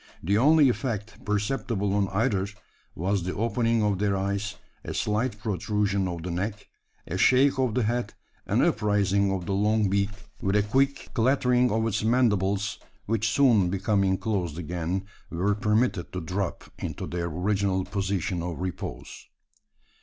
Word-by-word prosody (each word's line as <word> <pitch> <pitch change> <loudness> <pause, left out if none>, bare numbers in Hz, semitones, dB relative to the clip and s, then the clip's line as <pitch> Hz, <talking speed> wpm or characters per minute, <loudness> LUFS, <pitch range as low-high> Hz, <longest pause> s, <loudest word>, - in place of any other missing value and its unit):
The 100 +5 +1
only 145 +5 +6
effect 115 -4 -3
perceptible 105 -1 -1
on 100 -1 +2
either, 95 0 0 0.5
was 95 +3 0
the 90 +1 -3
opening 115 0 +1
of 100 -3 +1
their 100 -1 +1
eyes, 100 +2 -2 0.3
a - - -5
slight 105 +2 0
protrusion 100 -1 -1
of 85 -2 -5
the 90 - -4
neck, 100 +4 -3 0.4
a 95 - -4
shake 130 +5 +4
of 130 -4 +1
the 125 - +2
head, 120 +3 -1 0.3
an - - +2
upraising 100 -2 +2
of 95 -2 -2
the 100 - -2
long 105 0 +2
beak, 100 0 +2 0.3
with 95 +1 0
a 105 - +4
quick 135 +6 0
clattering 125 0 +3
of 110 +1 +1
its 110 -2 -1
mandibles 105 -4 +1 0.3
which 110 0 0
soon 115 -8 +4
becoming 95 0 +1
closed 90 -9 -2
again, 90 +2 -3 0.2
were 95 +5 0
permitted 105 -3 0
to 90 - -2
drop 90 +2 -3 0.2
into - - -4
their 85 0 -3
original 95 +2 0
position 95 -2 -2
of 85 -1 -4
repose. 90 -1 -6
100 Hz, 155 wpm, -26 LUFS, 95-110 Hz, 0.5 s, only